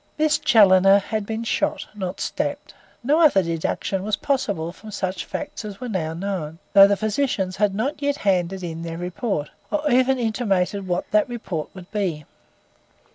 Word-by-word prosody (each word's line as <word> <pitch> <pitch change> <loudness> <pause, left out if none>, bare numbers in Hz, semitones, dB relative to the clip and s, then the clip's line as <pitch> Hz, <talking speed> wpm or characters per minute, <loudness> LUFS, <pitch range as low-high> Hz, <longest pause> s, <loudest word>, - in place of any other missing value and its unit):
Miss 310 0 +2
Challoner 195 -4 +6
had 205 +1 -3
been 225 +1 -3
shot, 230 - -1
not 190 -3 -5
stabbed. - - -3 0.3
No 295 +6 +3
other 280 - +5
deduction 170 +3 -2
was 210 +1 0
possible 205 - -1
from 215 +4 -13
such 190 -3 -3
facts 290 - -6
as 205 -2 -7
were 250 - -5
now 165 -6 -2
known, 170 -4 -4 0.2
though 195 -1 +9
the 200 0 +1
physicians 215 -4 -1
had 205 -1 +1
not 275 +7 -2
yet 285 0 +1
handed 185 -1 0
in 165 -1 -5
their 165 0 -5
report, 180 - -3 0.2
or 300 0 -1
even 260 +2 +4
intimated 205 -5 0
what 180 0 -1
that 210 +3 +3
report 195 -10 -4
would 185 -1 -11
be. 180 -8 -2
200 Hz, 170 wpm, -23 LUFS, 180-225 Hz, 0.3 s, though